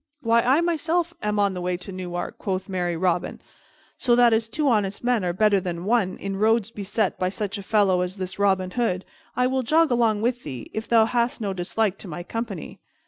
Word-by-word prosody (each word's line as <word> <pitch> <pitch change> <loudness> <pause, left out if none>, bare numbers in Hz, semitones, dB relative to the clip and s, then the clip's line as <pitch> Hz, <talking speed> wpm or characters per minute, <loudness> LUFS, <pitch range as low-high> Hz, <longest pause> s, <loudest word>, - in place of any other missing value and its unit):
"Why, 230 0 +3
I 265 +7 +3
myself 340 0 0
am 210 0 -1
on 200 -1 +2
the 180 - -5
way 180 0 -1
to 180 +2 -9
Newark," 180 -1 -5
quoth 190 -1 -3
merry 175 -3 -2
Robin, 180 0 0 0.6
"so 240 -2 +3
that, 240 -1 +5
as 220 0 +1
two 300 +4 -1
honest 210 -5 +1
men 245 -4 +1
are 175 - 0
better 205 +2 +3
than 175 -1 -5
one 205 -4 +1
in 195 -1 -4
roads 220 +1 +2
beset 205 -1 -2
by 185 - +1
such 205 +1 -4
a - - -5
fellow 195 -3 +2
as 180 +2 -3
this 190 +1 -5
Robin 190 -2 +2
Hood, 190 -6 -1 0.3
I 250 - +2
will 260 +1 +1
jog 310 +4 +3
along 225 -3 +2
with 245 +1 0
thee, 130 -6 -8
if 220 +1 -4
thou 225 -2 +5
hast 235 +1 0
no 200 -3 -2
dislike 195 +2 -1
to - - -8
my 175 +1 -6
company." 220 -2 -6
205 Hz, 215 wpm, -24 LUFS, 185-235 Hz, 0.6 s, that